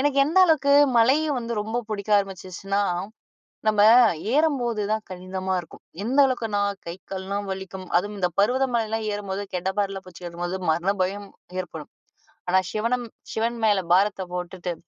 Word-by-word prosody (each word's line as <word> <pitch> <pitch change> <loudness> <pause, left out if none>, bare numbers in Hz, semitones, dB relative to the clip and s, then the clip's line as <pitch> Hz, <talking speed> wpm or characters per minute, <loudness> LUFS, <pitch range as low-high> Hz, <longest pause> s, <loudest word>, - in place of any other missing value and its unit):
எனக்கு 280 0 +1
எந்த 335 +5 +2
அளவுக்கு 280 -3 +3 0.3
மலையும் 285 +5 +3
வந்து 235 0 -4
ரொம்ப 220 +3 -2
புடிக்க 210 0 -4
ஆரம்பிச்சுச்சுனா, 195 0 -3 0.9
நம்ம 215 -1 +3 0.5
ஏறும்போது 255 -8 +1
தான் 220 0 -1
கடினமா 185 +1 -4
இருக்கும். 165 - -15 0.2
எந்த 255 +5 -1
அளவுக்குனா, 225 -6 -1 0.2
கை, 170 +1 -5 0.2
கால்லாம் 195 +1 -4
வலிக்கும். 190 0 -7
அதுவும் 205 +3 -4
இந்த 180 -2 +1
பருவத 255 +6 +3
மலையெல்லாம் 225 -1 0
ஏறும்போது 200 -1 -4
கடப்பாறயபுடிச்சு 190 -1 -3
ஏறும்போது 175 +2 -4
மரண 175 +5 +1
பயம் 200 +2 -3 0.3
ஏற்படும். 160 -4 -8 0.6
ஆனா, 185 - +4
சிவன 230 +3 0 0.4
சிவன் 230 +1 -1
மேல 205 -2 +4
பாரத்த 195 +1 +3
போட்டுட்டு, 180 0 -4
200 Hz, 135 wpm, -24 LUFS, 185-230 Hz, 0.9 s, ஆனா